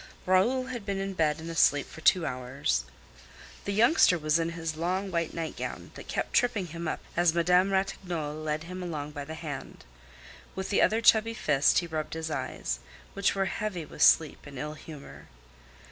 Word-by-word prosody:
Raoul 215 Hz, +8 st, +3 dB
had 250 Hz, -4 st, -6 dB
been 200 Hz, -1 st, -2 dB
in 195 Hz, 0 st, -3 dB
bed 155 Hz, -3 st, +1 dB
and 160 Hz, -, -8 dB
asleep 145 Hz, -3 st, +3 dB
for 160 Hz, -, -11 dB
two 175 Hz, +1 st, +4 dB
hours. 125 Hz, -, -1 dB, 0.8 s
The 200 Hz, -, -1 dB
youngster 220 Hz, -, +5 dB
was 155 Hz, 0 st, +1 dB
in 165 Hz, 0 st, 0 dB
his 165 Hz, -1 st, -3 dB
long 185 Hz, +4 st, -1 dB
white 170 Hz, -2 st, -1 dB
nightgown, 165 Hz, -1 st, -5 dB
that -, -, -11 dB
kept -, -, -3 dB
tripping 230 Hz, -6 st, +2 dB
him 170 Hz, 0 st, -6 dB
up -, -, -3 dB
as 170 Hz, -1 st, +3 dB
Madame 180 Hz, +3 st, +4 dB
Ratignolle 180 Hz, -5 st, -2 dB
led 155 Hz, 0 st, -3 dB
him 180 Hz, +2 st, -7 dB
along 150 Hz, -4 st, -4 dB
by 145 Hz, -1 st, -6 dB
the 160 Hz, +2 st, -7 dB
hand. 150 Hz, -4 st, -7 dB, 0.7 s
With 190 Hz, +1 st, -4 dB
the 200 Hz, -, +3 dB
other 220 Hz, +1 st, +3 dB
chubby 225 Hz, 0 st, +5 dB
fist 145 Hz, -8 st, +3 dB
he 175 Hz, -, +2 dB
rubbed 160 Hz, -1 st, -4 dB
his 160 Hz, -1 st, -4 dB
eyes, 65 Hz, -, -3 dB, 0.3 s
which 200 Hz, 0 st, +1 dB
were 195 Hz, 0 st, +1 dB
heavy 190 Hz, -4 st, -3 dB
with 150 Hz, -, -10 dB
sleep 160 Hz, -3 st, +4 dB
and 140 Hz, -1 st, -10 dB
ill 150 Hz, +3 st, -4 dB
humor. 155 Hz, -1 st, -11 dB
165 Hz, 185 wpm, -28 LUFS, 155-195 Hz, 0.8 s, youngster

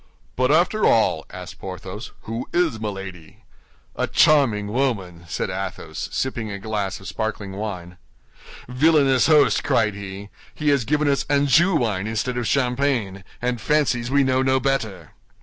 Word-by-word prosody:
"But 130 Hz, 0 st, +1 dB
after 175 Hz, +7 st, +2 dB
all," 110 Hz, -8 st, +3 dB
asked -, -, -9 dB
Porthos, -, -, -7 dB
"who 115 Hz, +3 st, -5 dB
is 170 Hz, -11 st, +1 dB
Milady?" 95 Hz, -6 st, -7 dB, 0.5 s
"A -, -, -1 dB
charming 110 Hz, -9 st, +3 dB
woman!" 100 Hz, -10 st, -2 dB
said 80 Hz, -, -3 dB
Athos, 95 Hz, 0 st, -5 dB
sipping 120 Hz, -4 st, -2 dB
a 100 Hz, -, -5 dB
glass 100 Hz, -1 st, -3 dB
of 95 Hz, -, -11 dB
sparkling 110 Hz, -3 st, -4 dB
wine. 95 Hz, -4 st, -6 dB, 0.7 s
"Villainous 135 Hz, 0 st, +3 dB
host!" 150 Hz, -2 st, +4 dB
cried 115 Hz, -6 st, +2 dB
he, 100 Hz, 0 st, -8 dB, 0.3 s
"he 150 Hz, -1 st, 0 dB
has 140 Hz, -5 st, +2 dB
given 150 Hz, +3 st, +1 dB
us 140 Hz, -1 st, +2 dB
Anjou 145 Hz, +6 st, +4 dB
wine 110 Hz, -8 st, 0 dB
instead 115 Hz, +3 st, -2 dB
of 120 Hz, -2 st, -2 dB
champagne, 125 Hz, -7 st, 0 dB, 0.2 s
and 125 Hz, -2 st, -1 dB
fancies 130 Hz, -5 st, +1 dB
we 140 Hz, +1 st, +3 dB
know 130 Hz, 0 st, +2 dB
no 130 Hz, 0 st, +2 dB
better! 110 Hz, -, -2 dB
120 Hz, 150 wpm, -22 LUFS, 100-140 Hz, 0.7 s, host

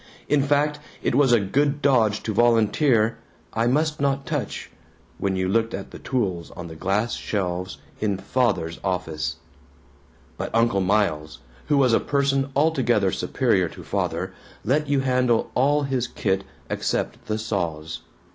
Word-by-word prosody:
In 150 Hz, -1 st, +3 dB
fact 145 Hz, +1 st, +1 dB, 0.2 s
it -, -, +1 dB
was 135 Hz, 0 st, +4 dB
a 120 Hz, -, +6 dB
good 140 Hz, +8 st, +1 dB
dodge 115 Hz, -7 st, +3 dB
to 110 Hz, -, -2 dB
volunteer 115 Hz, +1 st, +3 dB, 0.3 s
"I 115 Hz, +1 st, +1 dB
must 150 Hz, +3 st, +1 dB
not 140 Hz, -1 st, +1 dB
touch," -, -, -4 dB, 0.5 s
when 95 Hz, -1 st, 0 dB
you 95 Hz, 0 st, 0 dB
looked 115 Hz, +3 st, +1 dB
at 100 Hz, -, -7 dB
the -, -, -9 dB
tools 95 Hz, -10 st, -2 dB
on 90 Hz, -, -6 dB
the 80 Hz, -, -9 dB
glass 100 Hz, +7 st, 0 dB
shelves 90 Hz, -6 st, -3 dB, 0.2 s
in 100 Hz, -3 st, 0 dB
Father's 95 Hz, -5 st, 0 dB
office. 80 Hz, -6 st, -2 dB, 1.0 s
But -, -, -2 dB
Uncle 115 Hz, -4 st, +3 dB
Miles, 90 Hz, -6 st, 0 dB, 0.3 s
who 145 Hz, -1 st, +3 dB
was 130 Hz, -4 st, +4 dB
a -, -, +5 dB
person 140 Hz, -1 st, +1 dB
altogether 130 Hz, -10 st, +2 dB
superior -, -, +1 dB
to -, -, -11 dB
Father, -, -, -2 dB, 0.3 s
let 150 Hz, +5 st, +1 dB
you 140 Hz, -2 st, +2 dB
handle 125 Hz, -3 st, +1 dB
all 145 Hz, +3 st, +3 dB
his 130 Hz, -3 st, -1 dB
kit 95 Hz, -1 st, -1 dB, 0.2 s
except -, -, -2 dB
the 110 Hz, -, -1 dB
saws. 85 Hz, -7 st, -3 dB
115 Hz, 150 wpm, -24 LUFS, 95-135 Hz, 1.0 s, a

